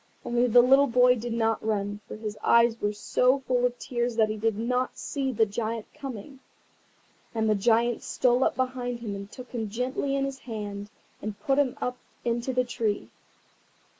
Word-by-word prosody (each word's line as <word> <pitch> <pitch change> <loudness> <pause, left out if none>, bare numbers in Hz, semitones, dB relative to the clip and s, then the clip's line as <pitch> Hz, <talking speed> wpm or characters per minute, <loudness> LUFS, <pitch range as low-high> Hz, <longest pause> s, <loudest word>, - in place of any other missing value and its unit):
Only 240 +1 +2
the 245 +1 +7
little 270 +3 +6
boy 250 0 +5
did 240 0 -5
not 225 -1 0
run, 205 -1 -1
for - - -7
his 215 -1 -5
eyes 235 -1 +4
were 205 - +1
so 250 +5 +2
full 250 -1 +2
of 245 0 -8
tears 240 -2 -2
that 220 -1 +3
he 215 - -2
did 215 -1 0
not 250 +3 -1
see 270 -2 -2
the 225 -2 +3
Giant 220 +1 -3
coming. 270 0 -8 1.0
And 220 -1 +1
the 215 - +4
Giant 230 +3 +2
stole 250 +1 +2
up - - +1
behind 250 -2 -2
him 215 -3 -4
and 200 0 -8
took 255 -1 -10
him 225 -4 -3
gently 255 +5 -1
in 275 0 +1
his 275 -1 -5
hand, 205 -4 -6 0.3
and 215 0 -5
put 275 -2 +2
him 270 -4 +1
up 250 0 -2 0.3
into 235 +2 0
the 255 0 +2
tree. 225 -3 -2
240 Hz, 190 wpm, -27 LUFS, 220-255 Hz, 1.0 s, the